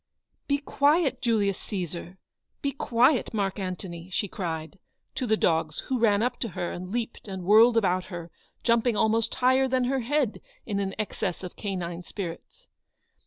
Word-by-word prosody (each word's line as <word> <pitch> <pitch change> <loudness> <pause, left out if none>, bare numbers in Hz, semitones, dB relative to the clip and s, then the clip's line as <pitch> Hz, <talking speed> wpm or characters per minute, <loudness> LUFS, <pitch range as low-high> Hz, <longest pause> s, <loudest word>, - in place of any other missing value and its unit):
"Be 280 - +3
quiet, 285 -1 +2
Julius 210 -6 +1
Caesar; 180 -1 -5 0.5
be 280 - +1
quiet, 250 -1 +2
Mark 200 -1 -1
Antony," 180 -2 -5
she 195 +2 -1
cried, 165 -1 -5 0.3
to 255 - -2
the 220 0 +3
dogs, 160 -4 +1
who 260 -2 +1
ran 215 -2 +4
up 250 - -1
to 235 - -1
her 175 - -1
and 180 +1 -6
leaped 235 +1 -4
and 190 -2 -5
whirled 225 +5 +6
about 185 -4 +2
her, 170 -3 -7 0.3
jumping 235 -1 +3
almost 220 +1 +2
higher 260 +1 +4
than 260 -1 +1
her 265 +2 +1
head 260 -1 0 0.2
in 200 -2 -1
an 195 -1 -2
excess 195 -4 -3
of 180 - -7
canine 180 -4 -4
spirits. 185 - -7
210 Hz, 165 wpm, -27 LUFS, 180-245 Hz, 0.5 s, whirled